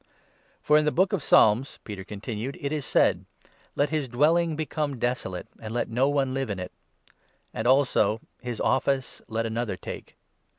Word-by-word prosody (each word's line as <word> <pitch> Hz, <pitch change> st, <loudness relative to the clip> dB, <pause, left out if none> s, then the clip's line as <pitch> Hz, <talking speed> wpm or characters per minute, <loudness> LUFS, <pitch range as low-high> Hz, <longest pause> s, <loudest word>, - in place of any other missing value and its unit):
"For 150 Hz, 0 st, +5 dB
in 155 Hz, -, 0 dB
the 150 Hz, -, +2 dB
Book 190 Hz, +5 st, +2 dB
of 195 Hz, -, 0 dB
Psalms," 115 Hz, +1 st, +4 dB
Peter 100 Hz, -3 st, -7 dB
continued, 110 Hz, +5 st, -5 dB
"it 140 Hz, -, -3 dB
is 150 Hz, -3 st, -2 dB
said -, -, +3 dB
— -, -, -43 dB
20 -, -, -29 dB
' -, -, -33 dB
Let 145 Hz, +1 st, +2 dB
his 155 Hz, -4 st, 0 dB
dwelling 155 Hz, +6 st, +2 dB
become 150 Hz, -2 st, -2 dB
desolate, 120 Hz, -7 st, -2 dB
And 110 Hz, +1 st, -6 dB
let 120 Hz, -, -1 dB
no 130 Hz, +4 st, +2 dB
one 135 Hz, -2 st, +1 dB
live 135 Hz, -2 st, -2 dB
in 100 Hz, -, -2 dB
it 90 Hz, 0 st, -6 dB, 0.4 s
'; -, -, -41 dB
and 110 Hz, +2 st, -2 dB
also 125 Hz, -5 st, +3 dB
— -, -, -46 dB
' -, -, -40 dB
His 120 Hz, -3 st, -5 dB
office 135 Hz, 0 st, 0 dB
let 115 Hz, +1 st, -2 dB
another 115 Hz, -3 st, -2 dB
take.' -, -, -8 dB
130 Hz, 205 wpm, -26 LUFS, 110-145 Hz, 0.4 s, For